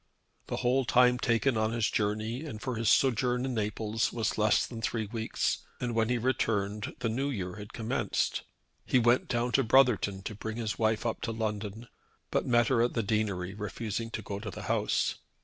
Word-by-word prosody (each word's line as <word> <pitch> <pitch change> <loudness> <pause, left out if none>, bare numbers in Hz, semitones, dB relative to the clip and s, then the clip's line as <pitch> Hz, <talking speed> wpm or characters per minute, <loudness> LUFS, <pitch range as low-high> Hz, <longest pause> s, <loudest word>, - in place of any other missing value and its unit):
The - - -2
whole 130 +2 +2
time 125 0 +4
taken 120 +1 +2
on 110 +1 +1
his 115 -2 +1
journey 110 +5 -1
and 140 -9 -6
for 130 +3 -3
his 115 -2 +1
sojourn 125 -1 +3
in 130 - -2
Naples 110 0 -1
was 115 -2 -1
less 105 0 +3
than 115 -2 -7
three 110 0 -1
weeks, 110 +1 -1 0.2
and 120 -1 -2
when 115 0 +1
he 125 - +2
returned 105 -4 -1
the - - +1
New 130 +6 -1
Year 95 -6 -4
had 105 0 -9
commenced. 115 -1 -1 0.4
He - - +2
went 120 +1 +3
down 120 0 0
to 135 - +3
Brotherton 115 -6 +3
to 110 - -4
bring 110 +2 -5
his 110 -3 -3
wife 110 0 +1
up 115 - -1
to 115 - -2
London, 110 0 -4 0.4
but - - 0
met 120 -1 +4
her 125 -4 +3
at 120 - +1
the 115 - +1
deanery, 100 -3 -1
refusing 105 +2 -4
to 110 -1 -5
go 100 0 -5
to 110 +1 -5
the 95 - -8
house. - - 0
115 Hz, 200 wpm, -30 LUFS, 105-120 Hz, 0.4 s, time